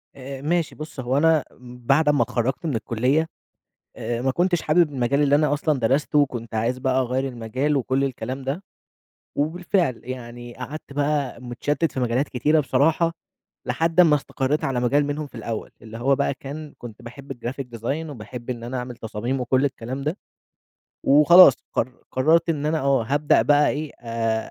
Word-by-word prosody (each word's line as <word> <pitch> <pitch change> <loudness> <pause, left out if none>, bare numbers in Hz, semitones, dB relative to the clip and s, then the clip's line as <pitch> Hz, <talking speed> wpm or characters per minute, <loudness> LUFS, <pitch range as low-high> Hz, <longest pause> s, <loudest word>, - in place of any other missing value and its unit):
آآ، 135 0 -8
ماشي 165 +2 0
بُص 155 -2 -8
هو 130 +2 0
أنا 160 -1 +4 0.2
بعد 125 +5 +1
أمّا 145 -1 +3
اتخرّجت 130 +8 -2
من 150 -6 -1
الكُلّيّة، 125 +8 +1 0.7
آآ 120 0 -3
ما 135 - +2
كنتش 175 +4 +1
حابب 155 0 +3
المجال 135 +2 +1
اللي 145 -1 +3
أنا 150 0 +3
أصلًا 150 -1 +1
درسته 135 +6 +2
وكنت 120 -6 -1
عايز 115 +3 0
بقى 130 0 +1
أغيّر 130 +2 -1
المجال 130 +5 -1
وكل 135 +1 +1
الكلام 130 0 -4
ده. 140 +8 -3 0.7
وبالفعل 165 - 0
يعني 120 -1 -8
قعدت 140 +3 -8
بقى 145 -2 -1
متشتت 145 +6 -2
في 130 - -3
مجالات 125 +3 0
كتيرة 150 +5 +2
بصراحة 160 +4 +2 0.5
لحد 165 +2 +2
أمّا 160 -4 +6
استقريت 140 +1 -2
على 130 -2 0
مجال 140 +4 +2
منهم 145 +1 -3
في - - -21
الأول، 115 -2 -5
اللي 115 0 -9
هو 135 +3 +2
بقى 140 0 0
كان، 145 +2 -8
كنت 120 0 -10
باحب 135 +3 -9
الgraphic 120 -1 -6
design 145 +8 -3
وباحب 120 0 -8
إن 120 -2 -5
أنا 125 +2 -4
أعمل 125 0 -6
تصاميم، 115 +4 -3
وكل 130 +2 +2
الكلام 130 0 -3
ده. 150 +5 -2 0.9
وخلاص 150 +2 +8 0.2
قر 125 - -1 0.2
قررت 160 +6 +3
إن 150 -2 -1
أنا 160 0 +1
آه 135 -3 +2
هابدأ 145 +5 +2
بقى 145 0 +4
إيه، 150 +1 -4
آآ 115 -1 -2
135 Hz, 170 wpm, -23 LUFS, 125-150 Hz, 0.9 s, وخلاص